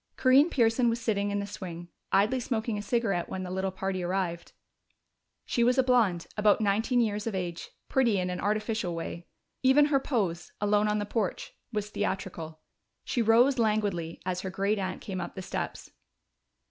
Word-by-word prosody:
Corinne 270 +5 +5
Pearson 235 -3 +3
was 230 +1 -1
sitting 205 -3 0
in 205 - -1
the 200 - -2
swing, 175 -4 -7 0.2
idly 215 +7 +3
smoking 225 -2 -2
a 205 - -3
cigarette 205 -5 0
when 185 - -4
the 180 - -5
little 190 +1 -1
party 190 0 -3
arrived. 175 -1 -2 0.9
She 235 - +1
was 250 +2 +3
a 260 - +5
blonde, 225 -9 +2
about 210 0 +4
nineteen 220 +4 +2
years 210 -1 -1
of 220 - -2
age, 175 -2 -4 0.2
pretty 240 -6 +2
in 180 -1 -1
an 180 - -4
artificial 215 -3 -1
way. 170 +1 -6 0.3
Even 265 +3 +6
her 275 - +5
pose, 200 - -2
alone 210 0 +2
on 210 0 +1
the 205 - -1
porch, 205 -2 -2 0.2
was 210 -2 -3
theatrical. 175 -6 -4 0.4
She 240 - -1
rose 240 +4 +4
languidly 205 -7 0
as 180 0 -2
her 190 - -4
great 200 +3 0
aunt 185 -1 -3
came 185 -2 -4
up - - -6
the 190 - -6
steps. - - -5
205 Hz, 180 wpm, -28 LUFS, 185-230 Hz, 0.9 s, Even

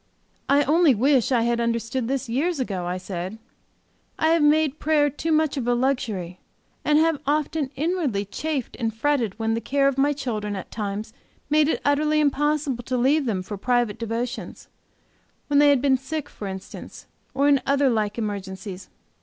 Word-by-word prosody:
"I 285 +1 +5
only 310 -2 +4
wish 265 +2 +2
I 240 -3 +3
had 235 0 +1
understood 235 +1 -1
this 270 0 -2
years 290 +7 0
ago," 190 -8 -2
I 180 +1 -2
said. 185 +2 -5 0.8
"I 315 - +2
have 330 0 +3
made 300 0 +3
prayer 295 -1 +2
too 325 +3 -3
much 310 -2 +2
of 245 -3 -2
a 245 - +3
luxury, 220 -9 -1 0.4
and 300 0 +3
have 320 -1 +3
often 300 -1 0
inwardly 290 - -1
chafed 285 +4 -4
and 225 -1 0
fretted 230 -3 0
when 225 0 0
the 230 - -1
care 275 +2 +1
of 275 -1 0
my 285 +2 +3
children, 220 -8 -3
at 190 - -7
times, 210 0 -4 0.4
made 305 -1 +4
it 320 - 0
utterly 300 +2 +2
impossible 295 -3 0
to 255 - -1
leave 275 +4 +2
them 200 -6 -1
for 205 +2 -6
private 240 -1 0
devotion 230 +3 -4 0.9
when 285 -1 +4
they 290 0 +6
have 280 -3 +4
been 270 -2 +4
sick, 290 +2 -5
for 205 - -7
instance, 190 0 -9 0.3
or 280 +2 +3
in 280 -2 +4
other 280 0 +3
like 215 -4 0
emergencies. 195 -3 -5
260 Hz, 180 wpm, -24 LUFS, 220-290 Hz, 0.9 s, they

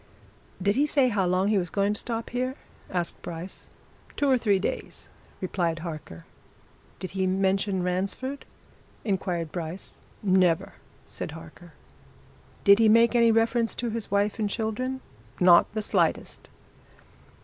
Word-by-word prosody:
"Did 200 +2 +1
he 290 +2 +3
say 275 -4 +3
how 200 -5 +1
long 185 +3 +2
he 210 -2 +3
was 175 -2 -3
going 200 +2 +1
to 210 - -1
stop 230 -1 -4
here?" 255 +2 -2 0.3
asked 175 -2 -3
Bryce. 170 +2 -7 0.5
"Two 285 - +2
or 265 - +5
three 210 -5 +2
days," 190 - -4 0.3
replied 175 -3 -1
Harker. 155 - -8 0.7
"Did 185 - -6
he 190 0 0
mention 190 0 +1
Ransford?" 195 +10 -2 0.6
inquired 180 -6 -1
Bryce. 170 +1 -6 0.2
"Never!" 185 -4 +2 0.3
said - - -6
Harker. 165 +1 -12 0.9
"Did 200 +1 +7
he 225 -1 +5
make 230 +2 +5
any 235 -1 +5
reference 225 +1 +2
to 235 -1 -3
his 225 -1 -4
wife 200 +2 +1
and 210 -2 0
children?" 250 +5 -2 0.4
"Not 175 -1 +6
the 215 - -1
slightest!" - - -1
200 Hz, 140 wpm, -26 LUFS, 180-230 Hz, 0.9 s, Did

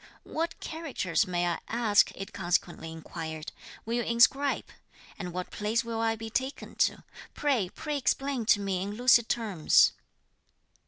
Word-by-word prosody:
"What 330 +1 -3
characters 260 - -1
may 175 -1 0
I 170 -1 -1
ask," 225 -3 +3
it 195 +1 -7
consequently 170 -1 -1
inquired, 160 -1 -7 0.3
"will 230 - -3
you 240 - +1
inscribe? 245 +5 +3 0.5
and 180 -1 -4
what 180 +1 -5
place 215 +3 0
will 230 -1 -3
I 225 0 +1
be 225 0 -7
taken 265 +4 -3
to? - - +1 0.3
pray, 255 -11 +1
pray 300 +8 -4
explain 270 -3 0
to 205 - +5
me 195 -2 -1
in 200 +2 -4
lucid 240 -1 +5
terms." 205 -9 +4
220 Hz, 150 wpm, -29 LUFS, 180-245 Hz, 0.5 s, to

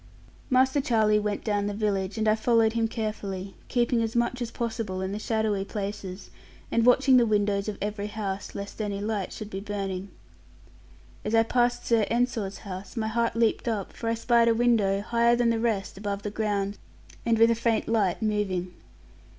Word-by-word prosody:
Master 260 +2 +3
Charlie 215 -4 +3
went 210 -1 -2
down 205 -2 0
the 205 - -3
village, 200 -1 -1
and 220 0 0
I 215 - +5
followed 225 0 +3
him 230 -1 +1
carefully, 200 -4 -4
keeping 240 -1 +1
as 225 0 -2
much 240 +1 0
as 240 - -2
possible 225 -5 -3
in 190 0 -2
the 205 - -3
shadowy 215 -3 0
places, 200 -2 -6 0.4
and 230 +1 +2
watching 260 +1 +6
the 240 - +5
windows 205 -1 +1
of 205 - -5
every 205 0 -3
house, 205 -2 -5
lest 200 +2 -6
any 200 -2 -2
light 205 -2 -2
should 215 0 -7
be 190 - -4
burning. 195 -2 -4 1.1
As 215 +2 0
I 225 - +6
passed 240 +1 +1
Sir 225 -3 +3
Ensor's 230 -4 0
house, 195 +4 -7
my 220 -1 0
heart 230 +1 0
leaped 230 +1 +1
up, 215 -5 -2
for 230 - -3
I 230 - +1
spied 235 0 +3
a 230 - +4
window, 220 -5 +2
higher 235 +2 +3
than 240 -1 +2
the 230 - 0
rest 210 -5 -1
above 200 -1 -3
the 210 - -3
ground, 205 -2 -1 0.4
and 230 -1 +2
with 230 +1 +6
a - - +5
faint 230 -1 0
light 215 -3 +1
moving. 190 -4 -1
215 Hz, 190 wpm, -27 LUFS, 200-230 Hz, 1.1 s, watching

